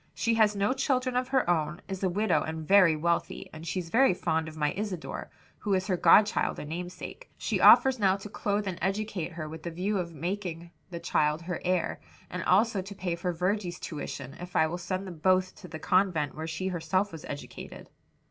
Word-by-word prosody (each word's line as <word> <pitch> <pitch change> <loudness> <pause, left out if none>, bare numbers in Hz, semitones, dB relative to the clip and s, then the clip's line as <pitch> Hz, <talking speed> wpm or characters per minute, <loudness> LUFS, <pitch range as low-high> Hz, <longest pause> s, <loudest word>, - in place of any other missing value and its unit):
"She 230 - +1
has 215 -2 +4
no 200 +4 +1
children 255 -1 0
of 250 0 +1
her 265 -5 +1
own, 160 -1 0
is 190 -1 -5
a 190 - +3
widow 210 +5 +2
and 160 -1 -5
very 190 -5 +6
wealthy, 170 +2 -1
and 160 +1 -9
she's 175 -2 -3
very 260 -5 +5
fond 160 -2 0
of 155 0 -9
my 150 -1 +1
Isadore, 195 -5 -4 0.3
who 205 -2 0
is 185 0 0
her 190 -2 +1
godchild 205 +5 +4
and 150 - -7
namesake. 180 - -7
She - - -1
offers 265 -2 +7
now 190 -2 +4
to 195 - -9
clothe 205 0 -1
and 185 -2 -4
educate 190 -2 -2
her, 155 -2 -5
with 160 +1 -8
the 170 - -4
view 190 +5 -1
of 170 -2 -3
making 170 +1 -4 0.2
the 170 -2 -6
child 150 0 +1
her 175 -1 -4
heir; 180 -2 0 0.3
and - - -3
also 225 -4 +3
to 200 +2 -9
pay 180 -2 -2
for 180 +1 -2
Virgy's 180 +1 -1
tuition, 140 -3 -6
if 180 0 -9
I - - +5
will 170 +3 -3
send 185 +2 -3
them 175 -4 -8
both 185 +2 +3
to - - -11
the 160 - -7
convent 175 -5 +1
where 160 +1 -5
she 165 +3 -4
was - - -4
herself 180 +4 0
educated." 145 - -8
180 Hz, 210 wpm, -29 LUFS, 165-200 Hz, 0.3 s, offers